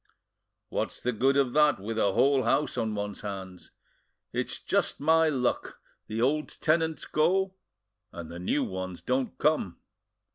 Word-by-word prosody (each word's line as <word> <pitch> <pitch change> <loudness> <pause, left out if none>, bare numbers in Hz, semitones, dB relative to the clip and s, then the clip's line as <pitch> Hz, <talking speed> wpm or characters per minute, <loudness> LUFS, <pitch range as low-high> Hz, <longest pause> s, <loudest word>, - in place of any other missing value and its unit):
"What's - - -3
the 125 - -1
good 135 +5 +2
of 135 -3 +2
that, 150 -4 +4
with 110 +3 -3
a 100 -3 +2
whole 135 +3 +4
house 130 +5 +1
on 110 -1 -1
one's 105 0 -4
hands? 95 -3 -7 0.6
It's - - -2
just - - 0
my 160 +2 +4
luck; 125 -4 -1 0.3
the 110 +1 -3
old 150 +6 0
tenants 160 0 +1
go, 185 +5 +2 0.6
and 85 -2 -8
the 85 - -7
new 135 +10 0
ones 95 -1 -5
don't 130 0 -1
come." 150 - +1
125 Hz, 150 wpm, -28 LUFS, 100-150 Hz, 0.6 s, that